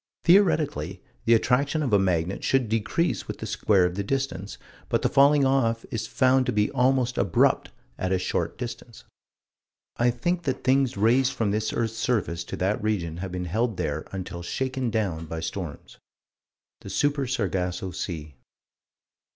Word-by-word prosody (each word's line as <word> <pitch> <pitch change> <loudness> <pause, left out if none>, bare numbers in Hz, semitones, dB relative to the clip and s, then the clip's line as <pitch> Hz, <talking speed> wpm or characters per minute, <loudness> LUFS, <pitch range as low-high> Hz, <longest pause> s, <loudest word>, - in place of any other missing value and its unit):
Theoretically 155 - +3 0.3
the 115 - +6
attraction 140 +7 +1
of 125 -6 -1
a 100 - +6
magnet 90 -1 0
should 135 -3 +2
decrease 115 - -1
with - - -5
the - - -6
square 95 -4 +2
of 90 - -1
the 100 +2 -3
distance, 115 -5 -3 0.3
but - - 0
the - - +3
falling 140 0 +5
off 120 -4 +1
is 110 -1 -3
found 130 0 +3
to - - +2
be 105 0 +1
almost 130 -1 +1
abrupt 95 -5 +2 0.3
at 95 - -1
a 95 - +3
short 90 - -2
distance. 120 -1 -7 0.9
I 120 +1 +3
think 175 +9 -1
that 130 - -2
things 130 -3 +2
raised 125 +5 +3
from 115 -5 0
this 110 +1 -1
earth's 115 -1 -2
surface 105 -8 -1
to - - -5
that 100 +4 0
region 90 -7 -1
have 95 +1 -5
been 90 0 -3
held 110 +4 -1
there 80 -3 -3
until 90 -2 -6
shaken 130 +6 -2
down 95 -8 -2
by 80 +1 -5
storms 80 -1 -6 0.8
The - - -10
Super 140 +6 0
Sargasso 95 -6 -2
Sea. 80 -4 -5
110 Hz, 165 wpm, -26 LUFS, 90-130 Hz, 0.9 s, the